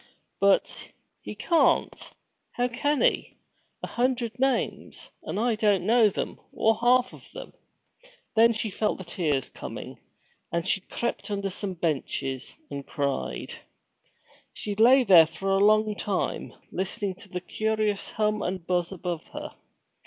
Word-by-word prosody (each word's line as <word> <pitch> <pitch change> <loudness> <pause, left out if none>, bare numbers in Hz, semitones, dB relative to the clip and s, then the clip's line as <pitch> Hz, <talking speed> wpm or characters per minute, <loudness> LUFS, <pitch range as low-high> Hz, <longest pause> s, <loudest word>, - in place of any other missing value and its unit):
'But, 200 0 +1 0.3
he - - -7
can't! 335 -2 +2 0.4
How 245 0 +1
can 285 +4 0
he? - - +1 0.5
A - - -2
hundred 245 -1 -1
names; 270 0 -1
and - - -4
I 235 +1 +2
don't 205 -4 +2
know 225 0 +5
them, - - -4
or 225 - +3
half 250 +2 +3
of - - -14
them.' - - -9 0.8
Then 230 +1 +6
she 220 -1 -3
felt 210 +2 0
the 190 - -7
tears 155 -7 -1
coming, - - -8 0.5
and 170 +1 -1
she 195 - +2
crept 235 +4 -4
in - - -2
under 200 -1 -3
some 190 -1 -3
benches, 135 -5 -2 0.2
and 140 0 -5
cried. 135 - -3 1.0
She 210 - -4
lay 250 +5 +6
there 175 -7 +8
a 195 - -2
long 215 +1 +4
time, 200 -2 -2 0.2
listening 190 +1 -2
to 200 - -14
the 180 - -3
curious 215 +2 -1
hum 215 0 0
and 180 -1 -3
buzz 175 -1 0
above 175 -3 -4
her. - - -6
205 Hz, 145 wpm, -27 LUFS, 180-230 Hz, 1.0 s, there